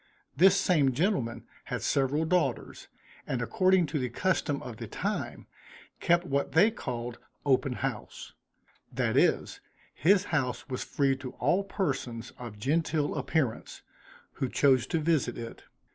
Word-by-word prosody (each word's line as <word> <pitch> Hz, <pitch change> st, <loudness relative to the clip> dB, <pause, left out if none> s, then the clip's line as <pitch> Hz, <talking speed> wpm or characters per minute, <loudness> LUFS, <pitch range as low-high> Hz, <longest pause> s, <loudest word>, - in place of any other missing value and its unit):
This 190 Hz, +6 st, +6 dB
same 145 Hz, -7 st, +3 dB
gentleman 145 Hz, -, -1 dB, 0.2 s
had -, -, -4 dB
several 140 Hz, +3 st, +1 dB
daughters, 180 Hz, +1 st, -1 dB, 0.4 s
and 130 Hz, -, -1 dB
according 185 Hz, +8 st, +3 dB
to 150 Hz, 0 st, -2 dB
the 125 Hz, -1 st, -2 dB
custom 145 Hz, 0 st, 0 dB
of 120 Hz, -3 st, -8 dB
the -, -, -6 dB
time, -, -, -4 dB, 0.5 s
kept 175 Hz, +1 st, +2 dB
what 140 Hz, -3 st, -1 dB
they 200 Hz, +8 st, +5 dB
called 120 Hz, -, -5 dB, 0.3 s
open 135 Hz, -1 st, +2 dB
house: 130 Hz, -3 st, -5 dB, 0.6 s
that -, -, 0 dB
is, -, -, +2 dB, 0.3 s
his 185 Hz, +7 st, +4 dB
house 130 Hz, -5 st, -1 dB
was 130 Hz, -2 st, -3 dB
free 140 Hz, -3 st, +1 dB
to 130 Hz, -2 st, -8 dB
all 175 Hz, +10 st, +1 dB
persons 130 Hz, -, -3 dB
of 120 Hz, -4 st, -8 dB
genteel 150 Hz, +5 st, 0 dB
appearance, 140 Hz, -3 st, -2 dB, 0.5 s
who 130 Hz, -, -3 dB
chose 130 Hz, -4 st, +3 dB
to -, -, 0 dB
visit 155 Hz, -6 st, +1 dB
it. 115 Hz, -1 st, -8 dB
140 Hz, 140 wpm, -29 LUFS, 125-170 Hz, 0.6 s, This